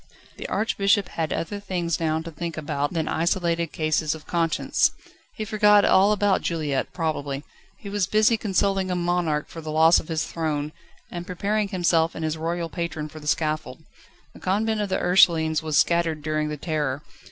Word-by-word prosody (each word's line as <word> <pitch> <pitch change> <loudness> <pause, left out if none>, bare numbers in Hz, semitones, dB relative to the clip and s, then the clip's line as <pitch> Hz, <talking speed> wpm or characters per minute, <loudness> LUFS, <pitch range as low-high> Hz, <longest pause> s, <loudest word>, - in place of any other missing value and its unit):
The - - -6
Archbishop 200 -2 +1
had 160 -2 -3
other 205 +5 -3
things 180 -4 -2
now 160 -1 0
to 165 - -7
think 165 +1 -5
about 145 -1 -2
than 160 -2 -1
isolated 170 0 0
cases 155 0 0
of 155 - -12
conscience. 165 -1 +1 0.5
He 215 - -4
forgot 210 -1 +4
all 195 +2 +5
about 205 -2 +2
Juliette, 150 -5 -2
probably. 145 -4 -3 0.3
He - - -11
was 200 -2 0
busy 215 +3 +4
consoling 195 -2 0
a 180 - 0
monarch 175 -4 0
for 165 - -9
the 155 - -7
loss 160 +2 +5
of - - -10
his 160 -2 -1
throne, 155 -2 -2 0.4
and 175 0 -6
preparing 205 +3 -1
himself 170 -4 +1
and 160 - -3
his 155 0 -1
royal 165 +1 -2
patron 160 -2 -4
for 155 - -10
the 150 - -10
scaffold. 155 +1 -1 0.5
The - - -14
Convent 215 +3 0
of 205 - -2
the - - +1
Ursulines 165 -3 +4
was 155 -2 -1
scattered 165 -3 +2
during 155 0 -1
the 150 - -4
Terror. 150 -3 -2
165 Hz, 180 wpm, -24 LUFS, 155-190 Hz, 0.5 s, all